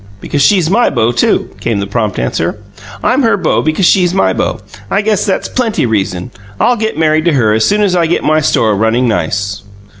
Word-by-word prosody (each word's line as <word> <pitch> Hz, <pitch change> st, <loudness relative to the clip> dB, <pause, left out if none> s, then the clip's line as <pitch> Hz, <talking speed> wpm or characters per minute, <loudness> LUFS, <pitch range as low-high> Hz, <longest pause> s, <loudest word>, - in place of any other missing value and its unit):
"Because 145 Hz, -, -2 dB
she's 180 Hz, +1 st, +3 dB
my 230 Hz, +8 st, +2 dB
beau, 115 Hz, 0 st, +1 dB
too," 120 Hz, -, 0 dB
came 115 Hz, -3 st, -2 dB
the 100 Hz, -, -2 dB
prompt 105 Hz, 0 st, -2 dB
answer. 80 Hz, -, -2 dB, 0.5 s
"I'm 255 Hz, +3 st, +2 dB
her 225 Hz, -5 st, +2 dB
beau 175 Hz, -5 st, 0 dB
because 155 Hz, +4 st, 0 dB
she's 180 Hz, 0 st, +3 dB
my 195 Hz, -, +2 dB
beau; -, -, -2 dB, 0.3 s
I 200 Hz, -, 0 dB
guess 210 Hz, -1 st, 0 dB
that's 190 Hz, -, -1 dB
plenty 230 Hz, -, -1 dB
reason! 95 Hz, -5 st, -2 dB, 0.3 s
I'll 245 Hz, -, +3 dB
get 220 Hz, -4 st, -3 dB
married 155 Hz, 0 st, +1 dB
to 170 Hz, -, +2 dB
her 110 Hz, -6 st, +2 dB
as 110 Hz, 0 st, +2 dB
soon 210 Hz, +1 st, +2 dB
as 190 Hz, -3 st, +1 dB
I 170 Hz, -2 st, +2 dB
get 165 Hz, -, -1 dB
my 155 Hz, 0 st, +2 dB
store 110 Hz, -6 st, +1 dB
running 110 Hz, +4 st, +1 dB
nice." 100 Hz, -2 st, -2 dB
155 Hz, 210 wpm, -12 LUFS, -, 0.5 s, she's